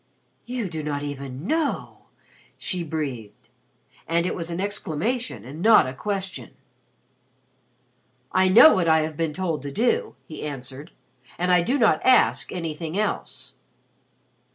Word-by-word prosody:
"You 245 -4 -3
do 160 -3 -5
not 145 -1 -3
even 140 0 -6
know!" 315 +3 -2 0.5
she 180 -2 -3
breathed 140 -9 -5 0.6
and 170 +1 +1
it - - -1
was 170 -1 -4
an 170 +1 -4
exclamation 205 - -3
and 145 +6 -8
not 220 +3 +6
a 130 - -5
question. 190 - -5 1.8
"I 185 0 +3
know 240 +11 +9
what 185 -4 +1
I 160 0 +5
have 155 0 -3
been 165 0 -1
told 165 -3 -2
to 140 0 -6
do," 435 - 0
he 155 - -8
answered. 140 +1 -7 0.5
"I 180 0 +3
do 250 +11 0
not 220 - +3
ask 255 -1 +4
anything 165 0 -4
else." 210 -1 -3
170 Hz, 135 wpm, -24 LUFS, 150-205 Hz, 1.8 s, know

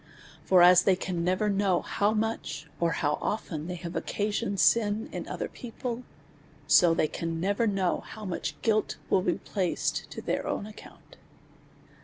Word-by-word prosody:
For 180 -2 +5
as 180 0 +8
they 190 0 +3
can 180 -2 -3
never 185 +4 +1
know 195 -3 +1
how 205 +1 +1
much, 215 -9 -2
or 170 -1 +1
how 150 -1 0
often 165 -7 -3
they 180 - -4
have 170 0 -7
occasioned 205 -1 -2
sin 210 +6 +3
in - - -5
other - - -3
people, 245 0 -6 0.6
so 170 +2 +5
they 155 - +2
can 165 +1 -4
never 200 +6 +1
know 195 -3 +1
how 215 -1 -10
much 180 -3 -4
guilt 215 -2 +1
will 190 - +4
be 180 -1 +1
placed 185 -4 -2
to - - -7
their - - -2
own - - -2
account. 215 0 -14
190 Hz, 165 wpm, -28 LUFS, 175-210 Hz, 0.6 s, as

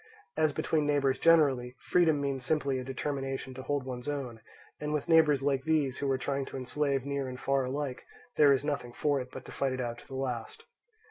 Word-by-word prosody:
As 155 -1 +3
between 150 0 0
neighbours 140 -2 +2
generally, 135 -7 +4
freedom 165 -4 +3
means 140 -2 -2
simply 140 -2 0
a - - -4
determination 135 0 -3
to 130 - -7
hold 140 0 -2
one's 125 +1 -5
own; 130 -6 -4 0.4
and 150 0 -3
with 150 +1 -1
neighbours 155 -4 +5
like 135 -2 +1
these, 150 -5 +1
who 140 - -1
are 135 - +2
trying 135 +1 -2
to - - -7
enslave 135 +1 -1
near 140 -1 -2
and 125 0 -7
far 135 -1 +1
alike, 135 0 -3 0.3
there 145 -2 +6
is 140 +1 +2
nothing 140 -5 -2
for 145 0 +1
it 125 - -8
but 130 - -9
to - - -10
fight 135 -1 -1
it 130 - -4
out 120 -1 -3
to - - -16
the 135 - -8
last. 125 -4 -4
135 Hz, 215 wpm, -30 LUFS, 130-145 Hz, 0.4 s, there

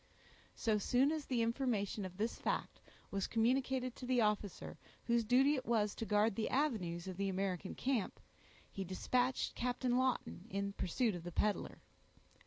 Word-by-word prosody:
So 220 -3 +1
soon 255 +7 +3
as 310 -2 -2
the 240 -3 +1
information 230 -4 0
of 185 0 -8
this 220 +3 -1
fact - - -2 0.3
was 195 -1 -1
communicated 255 +2 +1
to 250 - -7
the 255 -1 +3
officer 210 -3 -1 0.3
whose 235 -1 +3
duty 260 +6 +4
it 265 - -1
was 215 -3 +2
to 225 - -5
guard 210 +1 +3
the 225 - -1
avenues 195 - 0
of 185 -1 -5
the 200 0 0
American 190 0 -2
camp, 255 -6 -1 0.5
he 195 - -4
dispatched 245 +8 0
Captain 250 0 0
Lawton 255 -6 -1
in 200 -1 -2
pursuit 215 +5 0
of 175 -2 -6
the 175 - -6
peddler. 210 +4 -1
225 Hz, 165 wpm, -36 LUFS, 200-255 Hz, 0.5 s, duty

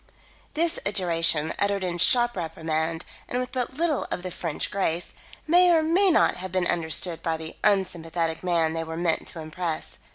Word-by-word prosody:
This 335 +1 +1
adjuration, 165 -5 +2
uttered 200 -1 0
in 175 -1 -3
sharp 240 +6 +4
reprimand 160 -1 -3 0.2
and 245 - -2
with 250 0 -4
but 255 0 -3
little 320 -1 0
of 180 - -4
the 185 - -5
French 165 -3 -3
grace, 175 -3 -2 0.3
may 355 +3 +5
or 330 -2 +4
may 365 +5 +4
not 335 - +3
have 185 0 -6
been 185 -1 0
understood 165 0 0
by 165 -1 -1
the 160 0 -8
unsympathetic 170 -5 0
man 165 -3 +1
they 165 0 -2
were 160 0 -6
meant 170 -1 0
to 165 - -6
impress. 160 +1 -5
175 Hz, 175 wpm, -25 LUFS, 165-240 Hz, 0.3 s, may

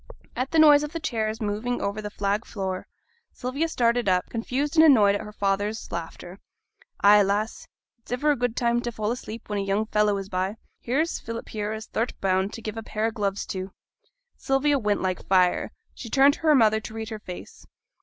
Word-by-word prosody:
At 255 +2 -2
the 325 - 0
noise 300 -2 +7
of 300 +2 -5
the 330 - -3
chairs 225 -7 -2
moving 215 +4 -2
over 200 +2 -2
the 210 - -5
flag 205 +1 -1
floor, 190 -5 -4 0.4
Sylvia 275 +6 -2
started 240 -7 +1
up, 180 -1 +1
confused 260 +6 -2
and 320 - +7
annoyed 220 -10 +6
at 205 - -2
her 210 - -8
father's 205 +1 -2
laughter. 170 +2 -7 0.6
'Ay, 205 +1 +7
lass; 205 +3 -1 0.3
it's 230 - -16
iver 290 +5 +2
a - - +2
good 245 -2 -1
time 235 0 +1
t' 240 - -3
fall 215 -1 -2
asleep 230 -2 -7
when 210 -1 -2
a - - 0
young 195 +2 0
fellow 210 -1 +2
is 195 -1 -5
by. 190 +2 -2 0.2
Here's 300 +8 -1
Philip 230 0 -7
here 210 -1 -3
as 220 0 -5
thou'rt 235 +2 -3
bound 190 +1 +1
t' 230 - -9
give 215 0 -5
a - - -3
pair 215 0 -3
o' 225 - +1
gloves 200 -3 -2
to.' 185 0 -5 0.6
Sylvia 275 +1 +1
went 210 -4 0
like 185 -1 -2
fire; 185 -2 +3 0.2
she 235 - -9
turned 275 +3 +5
to - - -9
her 310 -2 +4
mother 220 -4 +4
to 220 - -9
read 220 0 -5
her 220 -2 -6
face. 180 -4 -10
220 Hz, 210 wpm, -25 LUFS, 200-245 Hz, 0.6 s, noise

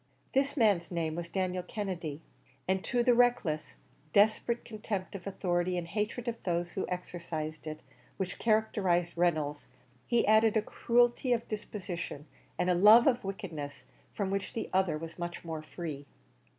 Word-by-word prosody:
This 275 +2 +1
man's 205 -8 +3
name 165 -3 -1
was 170 +1 -5
Daniel 185 -1 -1
Kennedy, 175 -6 -4 0.4
and 190 0 +1
to 245 -2 +1
the 245 0 +5
reckless, 240 -11 +2 0.4
desperate 220 +3 +3
contempt 210 -4 -4
of 195 -1 -7
authority 180 -2 0
and 170 -1 -3
hatred 215 +6 -2
of 235 -1 -3
those 175 -1 -1
who 190 - -3
exercised 165 -4 -5
it, 155 0 -5 0.4
which 190 -1 -3
characterized 195 -6 +2
Reynolds, 155 -4 0 0.4
he 235 -1 +3
added 220 +1 +5
a 215 - +2
cruelty 240 +3 +2
of 235 0 -2
disposition, 185 -8 -5 0.3
and 180 - +1
a 180 - +4
love 210 +6 +8
of 250 -3 +3
wickedness, 160 -7 -6 0.3
from 195 -2 -2
which 195 -1 -2
the 225 - -4
other 185 -4 +2
was 165 +2 -8
much 175 0 -5
more 160 -2 -4
free. 155 -3 -6
185 Hz, 155 wpm, -31 LUFS, 170-220 Hz, 0.4 s, love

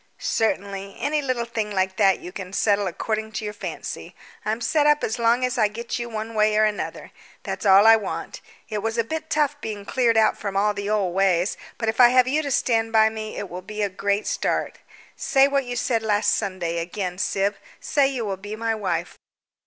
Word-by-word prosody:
"Certainly; 200 -2 -2
any 300 +1 0
little 255 -4 -1
thing 225 -2 -3
like 190 -1 -1
that 195 -3 +4
you 180 - -9
can 185 0 -8
settle 205 -1 +2
according 220 +4 -3
to 215 0 -4
your 210 - -4
fancy. - - -7 0.3
I'm 220 +2 -1
set 295 +4 +2
up 295 0 +3
as 220 +3 -2
long 235 +2 +3
as 250 0 -2
I 215 - +5
get 230 +3 -5
you 235 0 -4
one 220 0 -5
way 215 0 +2
or 215 - +5
another, 210 -1 -4 0.3
that's - - -3
all 195 +2 +7
I 225 0 +9
want. 210 - -5 0.3
It 215 -3 -3
was 225 +2 -2
a 230 - +3
bit 315 +6 -5
tough 295 -2 0
being 210 -2 -5
cleared 235 0 +2
out 220 - +3
from 200 -2 -3
all 210 +1 +2
the 200 0 -4
old 200 -4 0
ways, 190 -1 +2 0.2
but 225 - -3
if 220 +2 -1
I 245 - +10
have 255 0 +4
you 295 +4 +1
to 290 - -4
stand 225 -3 +1
by 220 -1 +5
me 220 -1 -6
it 205 - -4
will 180 +1 -7
be 210 +3 -4
a 200 - 0
great 200 +2 -1
start. - - -1 0.4
Say 270 -1 +3
what 280 -1 0
you 245 0 -4
said 235 -1 0
last 210 -1 +2
Sunday, 185 -5 -2
again. 180 +1 -4
Syb, 200 0 0 0.2
say 285 -2 +2
you 255 -4 -3
will 195 -2 -3
be 205 +3 -7
my 225 0 -1
wife." 180 -5 -3
215 Hz, 220 wpm, -23 LUFS, 200-235 Hz, 0.4 s, I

